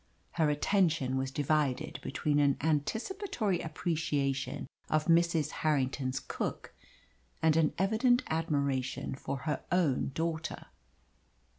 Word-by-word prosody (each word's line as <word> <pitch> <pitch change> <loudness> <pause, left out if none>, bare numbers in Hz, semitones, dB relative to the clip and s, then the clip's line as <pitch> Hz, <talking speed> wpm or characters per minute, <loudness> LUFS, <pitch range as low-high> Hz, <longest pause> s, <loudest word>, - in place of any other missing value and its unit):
Her 160 -3 +2
attention 155 -4 +2
was 130 0 -1
divided 145 -1 0
between 145 +1 0
an 140 -2 +3
anticipatory 210 - -1
appreciation 150 -5 -1 0.2
of 155 0 +2
Mrs. 170 -2 +3
Harrington's 135 -3 0
cook - - -4 0.7
and 160 -1 +5
an 160 -2 +3
evident 225 +6 +3
admiration 140 -5 -1
for 135 +1 -4
her 150 -2 -1
own 170 -9 +2
daughter. 165 0 -3
155 Hz, 105 wpm, -31 LUFS, 140-170 Hz, 0.7 s, and